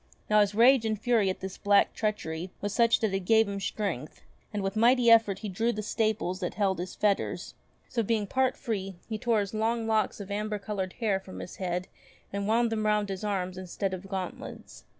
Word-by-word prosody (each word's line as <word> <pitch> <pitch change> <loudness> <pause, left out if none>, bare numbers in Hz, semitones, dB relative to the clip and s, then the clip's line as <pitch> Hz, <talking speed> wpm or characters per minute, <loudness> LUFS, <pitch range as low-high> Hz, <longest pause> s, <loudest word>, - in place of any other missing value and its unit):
Now 210 0 +6
his 205 0 +1
rage 245 +2 +6
and 215 -2 -1
fury 225 -4 +2
at 185 - -4
this 190 0 -6
black 200 0 +4
treachery 185 -5 -2
was 205 0 -3
such 230 0 +4
that 220 -3 +1
it 195 - +1
gave 220 +4 +4
him 200 0 -3
strength, 190 - -4 0.3
and 205 -2 -3
with 195 +1 -2
mighty 235 +1 +5
effort 225 -4 +5
he - - -1
drew 225 +5 0
the 215 -2 -4
staples 215 -4 -1
that 180 -3 -3
held 195 -4 +1
his 180 +1 -5
fetters; 205 -2 0 0.3
so 235 - -1
being 220 -1 0
part 260 +5 +1
free 195 -4 -3
he 220 -1 -4
tore 230 -2 +2
his 200 0 -5
long 225 +1 0
locks 220 -1 +1
of 200 0 -7
amber 210 +1 -2
coloured 195 -2 -4
hair 210 -5 0
from 190 -1 -11
his - - -8
head 180 -1 -2 0.5
and 200 0 -2
wound 230 +1 +2
them 215 -1 0
round 210 -1 +1
his 195 +1 -4
arms 185 -3 -2
instead 185 +1 -3
of 185 +1 -7
gauntlets. 185 - -6
205 Hz, 210 wpm, -28 LUFS, 190-220 Hz, 0.5 s, Now